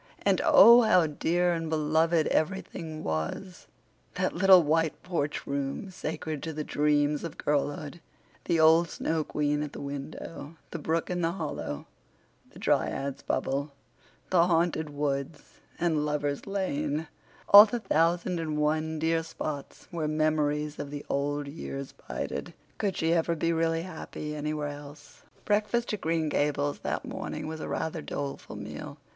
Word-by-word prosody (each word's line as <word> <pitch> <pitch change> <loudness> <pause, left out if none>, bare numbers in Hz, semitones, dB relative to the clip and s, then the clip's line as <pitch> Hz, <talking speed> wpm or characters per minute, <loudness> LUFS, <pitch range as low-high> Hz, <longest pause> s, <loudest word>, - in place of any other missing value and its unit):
And - - +3
oh, 235 +1 +9
how 185 -7 +5
dear 175 +4 +1
and 165 -1 -3
beloved 160 +1 +2
everything 160 -2 -2
was—that 80 - -5
little 190 -3 +7
white 160 +1 +1
porch 165 -5 -2
room, 140 +7 -3
sacred 155 -4 -4
to 160 - -4
the 150 0 -3
dreams 150 0 +1
of 165 -3 -6
girlhood, 145 +2 -2 0.4
the 170 -2 +1
old 160 +2 +6
Snow 160 -1 -1
Queen 150 0 -1
at 150 -1 -4
the - - -7
window, 145 +2 -7 0.2
the 170 - -4
brook 160 +3 -1
in 175 0 -1
the 165 0 +1
hollow, 150 - -4 0.6
the - - -16
Dryad's 140 -1 0
Bubble, 140 +2 -2 0.6
the 175 -2 +5
Haunted 165 -2 +1
Woods, 145 0 -4 0.2
and 160 -4 +1
Lover's 145 0 -2
Lane—all 160 +3 +4
the 240 +3 -2
thousand 175 -2 +1
and 155 -2 -2
one 155 +1 0
dear 165 +1 +1
spots 155 -3 -6
where 165 -3 -2
memories 150 -1 0
of 140 - -4
the 145 0 -7
old 145 +1 -1
years 140 -2 -6 0.2
bided. - - -4 0.2
Could 200 -4 -1
she 165 +1 +2
ever 170 0 +1
be 165 +1 0
really 165 0 +1
happy 160 -3 -6
anywhere 150 0 -2
else? 145 0 -11 0.2
Breakfast 215 +3 +1
at 210 - -3
Green 160 -1 0
Gables 145 -1 0
that - - -3
morning - - -5
was 160 0 -5
a - - -5
rather 160 0 -2
doleful 140 -2 -5
meal. - - -7
155 Hz, 145 wpm, -28 LUFS, 145-170 Hz, 0.6 s, oh